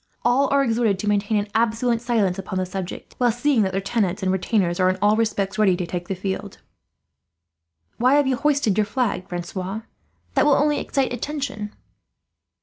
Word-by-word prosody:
All 260 +3 +3
are 280 0 +4
exhorted 225 -5 +1
to 210 - -4
maintain 205 +1 +1
an 205 0 -1
absolute 230 +1 +1
silence 220 -7 +1
upon 190 0 -4
the 185 - 0
subject, 185 0 -6
while 245 -1 +4
seeing 245 +1 +2
that 190 -2 +1
their 195 - -1
tenants 195 -1 -1
and 185 - +2
retainers 190 -2 0
are, 185 0 +4
in 185 - 0
all 205 +2 +4
respects, 210 -2 -1
ready 190 -4 +4
to 180 - -2
take 175 +1 -5
the 195 - -2
field." 190 +1 -4 1.4
"Why 255 +4 +4
have 290 -1 +4
you 265 -1 +1
hoisted 280 -8 +1
your 210 - +3
flag, 200 -6 -2
Francois? 185 +4 -4 0.5
That - - +3
will 290 - +6
only 295 0 +2
excite 270 -3 -1
attention." 245 -5 -4
215 Hz, 185 wpm, -23 LUFS, 190-245 Hz, 1.4 s, will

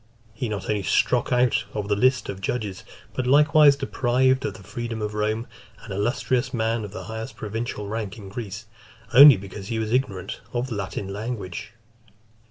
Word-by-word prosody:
He 115 +1 -3
not 105 -3 -4
only 105 -1 0
struck 120 +6 +1
out 125 -1 +3
of 105 -2 -2
the 105 - +2
list 130 +5 +2
of 95 - -6
judges, 100 -3 -3 0.3
but 130 -1 -2
likewise 150 +1 +6
deprived 130 -1 +1
of 100 - -3
the 95 - -12
freedom 115 +3 -5
of 105 -1 -3
Rome, 110 +2 -1 0.4
an 110 - -10
illustrious 120 +4 0
man 115 0 0
of 105 - -6
the 110 - -7
highest 110 0 -6
provincial 110 -1 -4
rank 105 -1 -4
in 100 -3 -10
Greece, 105 0 -6 0.5
only 140 -1 +10
because 95 +1 -9
he 115 - -2
was 110 -1 -2
ignorant 105 -8 -1
of 120 +1 0
the 115 - -3
Latin 100 0 -4
language. 105 -1 -5
110 Hz, 175 wpm, -24 LUFS, 100-125 Hz, 0.5 s, only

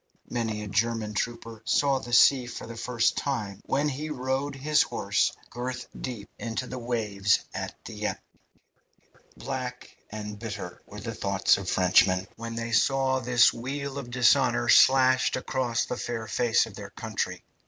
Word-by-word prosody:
Many 110 -3 -2
a - - -6
German 110 +1 0
trooper 115 +1 -4
saw 140 -2 +2
the 120 - -9
sea 125 +2 +6
for 125 - -7
the 115 - -8
first 115 0 0
time 105 -8 -3
when 145 +2 +1
he 150 +2 -3
rode 135 0 -2
his 150 +2 +2
horse - - +1 0.2
girth 125 +1 -4
deep 115 -6 -6
into 115 +2 -3
the 130 0 -6
waves 105 -5 +1
at - - -5
Dieppe. - - -4 1.2
Black 125 -2 -5
and 105 -1 -6
bitter 105 -5 -6
were - - -9
the - - -5
thoughts - - +2
of - - -4
Frenchmen 95 +1 +3
when 115 0 -6
they 115 0 -4
saw 130 +3 +2
this 125 -1 +4
weal 140 +3 -4
of 125 -3 -8
dishonour 120 - +3
slashed 130 -1 +5
across 130 -2 -1
the 125 - -4
fair 115 -2 -4
face 115 +2 +2
of - - -11
their - - -8
country. - - -4
120 Hz, 155 wpm, -27 LUFS, 110-130 Hz, 1.2 s, sea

